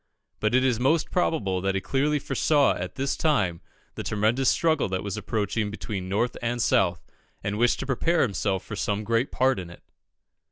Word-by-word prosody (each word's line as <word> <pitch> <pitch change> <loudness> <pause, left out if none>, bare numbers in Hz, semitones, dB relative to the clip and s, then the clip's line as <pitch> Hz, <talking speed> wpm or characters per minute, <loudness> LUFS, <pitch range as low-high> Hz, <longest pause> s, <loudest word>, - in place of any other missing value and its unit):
But 110 +3 +1
it 130 - +4
is 125 -3 +1
most 150 +5 +1
probable 100 - 0
that 95 0 0
he - - +1
clearly 145 +8 0
foresaw 140 +1 +2
at 90 0 -6
this 135 +1 -1
time 105 - +1 0.3
the - - -5
tremendous 110 +5 +1
struggle 160 -9 +2
which 95 0 -2
was 100 -2 -3
approaching 105 -1 -2
between 100 -3 -5
North 110 +5 0
and 120 +1 -1
South, 115 - +2 0.4
and 105 +2 -2
wished 120 0 +3
to - - -3
prepare 160 +5 +1
himself 100 -3 -1
for 105 - -6
some 105 +1 -1
great 115 +4 0
part 130 -3 +2
in 90 -2 -7
it. 85 - -14
115 Hz, 190 wpm, -26 LUFS, 100-135 Hz, 0.4 s, it